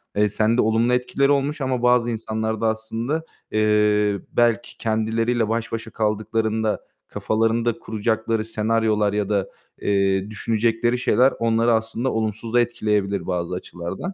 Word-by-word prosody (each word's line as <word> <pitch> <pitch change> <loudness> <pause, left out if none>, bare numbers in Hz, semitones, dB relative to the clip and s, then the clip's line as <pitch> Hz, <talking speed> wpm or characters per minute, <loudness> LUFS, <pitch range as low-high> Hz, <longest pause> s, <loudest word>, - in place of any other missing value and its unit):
eee, 105 0 +3
sende 110 +4 +2
olumlu 115 +3 +2
etkileri 135 +3 +1
olmuş 145 +2 0
ama 130 -2 -1
bazı 125 -1 +4
insanlar 110 -1 -3
da 115 - +2
aslında, 115 +7 -2 0.3
eee, 105 -1 +2
belki 120 0 +1
kendileriyle 115 +1 0
baş 115 0 -2
başa 115 -1 -5
kaldıklarında 110 0 -1 0.3
kafalarında 115 +1 0
kuracakları 110 0 -1
senaryolar 110 -2 +1
ya 105 -1 -1
da, 100 -2 0 0.3
eee, 100 0 +1
düşünecekleri 115 +2 0
şeyler 125 +1 +3
onları 115 0 +2
aslında 115 +3 -1
olumsuz 110 +1 -3
da 120 - +5
etkileyebilir 105 -5 -1
bazı 90 -1 -2
açılardan. 90 - -6
110 Hz, 130 wpm, -22 LUFS, 105-115 Hz, 0.3 s, da